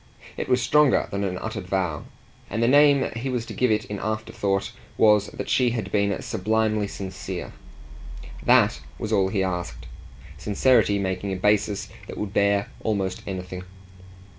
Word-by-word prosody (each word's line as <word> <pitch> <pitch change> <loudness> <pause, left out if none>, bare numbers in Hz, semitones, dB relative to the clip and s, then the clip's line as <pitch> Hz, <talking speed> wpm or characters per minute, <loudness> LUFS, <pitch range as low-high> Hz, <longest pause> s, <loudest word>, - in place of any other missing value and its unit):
It - - -4
was 125 -1 +3
stronger 150 +1 +4
than 100 0 -2
an 90 -2 -2
uttered 110 -1 -5
vow, 90 -6 -1 0.4
and 115 - -1
the - - +4
name 145 0 +5
he 120 +3 -3
was 125 -3 -2
to - - -8
give 125 - +1
it 105 -1 +1
in 105 -1 -5
afterthought 105 -2 -2 0.3
was 105 -1 +5
that - - -6
she 125 -2 +3
had 110 - -4
been 100 -1 +1
sublimely 110 +1 0
sincere. 95 -2 -6 0.9
THAT - - +4 0.2
was 110 0 -3
all 95 -2 +3
he 95 -1 0
asked 90 -2 -4 0.5
sincerity 105 -1 +3
making 95 0 -2
a - - -1
basis 105 +1 +1 0.2
that - - -8
would 105 -1 -4
bear 100 -1 +2
almost 100 -4 -1
anything. 90 -1 -5
100 Hz, 160 wpm, -24 LUFS, 95-110 Hz, 0.9 s, name